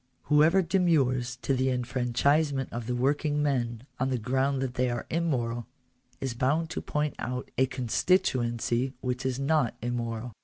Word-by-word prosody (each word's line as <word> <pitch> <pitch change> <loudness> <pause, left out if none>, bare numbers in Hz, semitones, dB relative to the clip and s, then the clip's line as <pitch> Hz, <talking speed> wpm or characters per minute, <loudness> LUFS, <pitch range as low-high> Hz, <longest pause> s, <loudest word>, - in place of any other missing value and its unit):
Whoever 155 +6 +4
demurs 140 -9 +2
to 135 - +1
the 130 0 +1
enfranchisement 130 +3 +1
of 115 -1 -4
the 125 - -1
working 145 +3 +1
men 120 -4 -1
on 130 +1 +1
the 130 - 0
ground 130 +4 0
that 130 -2 -3
they 125 0 +1
are 120 0 -3
immoral, 120 -9 -1 0.5
is 130 -3 -2
bound 150 +7 0
to - - -3
point 150 -1 -1
out 125 +1 -4
a 130 - +3
constituency 125 -2 +1
which 125 0 -2
is 130 -1 -1
not 140 -3 +1
immoral. 120 0 -3
130 Hz, 155 wpm, -28 LUFS, 120-145 Hz, 0.5 s, Whoever